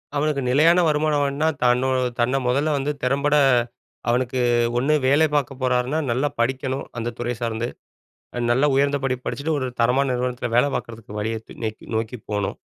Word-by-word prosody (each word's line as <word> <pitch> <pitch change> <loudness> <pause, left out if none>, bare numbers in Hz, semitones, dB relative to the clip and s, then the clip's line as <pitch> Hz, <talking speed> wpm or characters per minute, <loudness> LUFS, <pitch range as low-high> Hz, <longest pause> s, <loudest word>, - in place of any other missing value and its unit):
அவனுக்கு 145 -1 0
நிலையான 165 +7 +5
வருமானம் 150 -1 +1
வேணும்னா 140 +3 0 0.2
தன்னோ 125 +1 +3 0.3
தன்ன 120 +3 +2
முதல்ல 145 +4 +1
வந்து 140 +2 -1
திறம்பட 140 +3 +2 0.7
அவனுக்கு 125 +1 0 0.4
ஒண்ணு 140 +5 +2
வேலை 145 +4 +5
பார்க்கப் 135 -2 -1
போறார்ன்னா 125 +3 +1
நல்லா 130 +5 +1
படிக்கணும், 130 +2 -1
அந்த 115 +1 -3
துறை 120 0 -2
சார்ந்து. 115 0 -2 0.7
அ - - -2
நல்லா 135 +5 +3
உயர்ந்தபடிப்பு 135 -2 0
படிச்சுட்டு 140 +6 -2
ஒரு 130 - -2
தரமான 130 +4 +2
நிறுவனத்தில 125 0 -2
வேல 125 - +5
பாக்கறதுக்கு 110 -2 -7
வழிய 110 +2 -2
தே - - -11
நேக்கி 110 -1 -4
நோக்கி 115 +2 -2
போணும். 105 -1 -2
130 Hz, 155 wpm, -22 LUFS, 120-145 Hz, 0.7 s, நிலையான